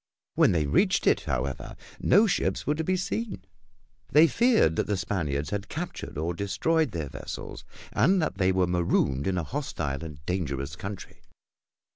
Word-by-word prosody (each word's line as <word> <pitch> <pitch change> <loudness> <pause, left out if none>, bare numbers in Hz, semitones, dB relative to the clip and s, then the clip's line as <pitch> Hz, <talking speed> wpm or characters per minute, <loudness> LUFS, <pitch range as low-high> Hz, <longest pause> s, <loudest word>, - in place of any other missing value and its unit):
When - - +4
they 80 -4 +1
reached 70 - +2
it, - - +4
however, 70 -1 -3 0.2
no 205 +4 +5
ships 195 - 0
were 150 - +2
to 160 +1 -2
be 185 +3 +1
seen. 200 +3 -3 0.7
They 155 +3 +7
feared 195 - +3
that - - 0
the 105 - 0
Spaniards 75 -6 -2
had 105 0 -3
captured 170 - -5
or 80 +3 -1
destroyed 155 - +1
their 80 - -4
vessels - - -7 0.3
and 180 - +4
that 155 - -2
they 95 0 +3
were 95 0 +2
marooned 85 -6 +1
in 95 -1 0
a 85 - 0
hostile 80 - -3
and 75 -3 -8
dangerous 75 -6 -2
country. 100 +3 -8
95 Hz, 165 wpm, -27 LUFS, -, 0.7 s, They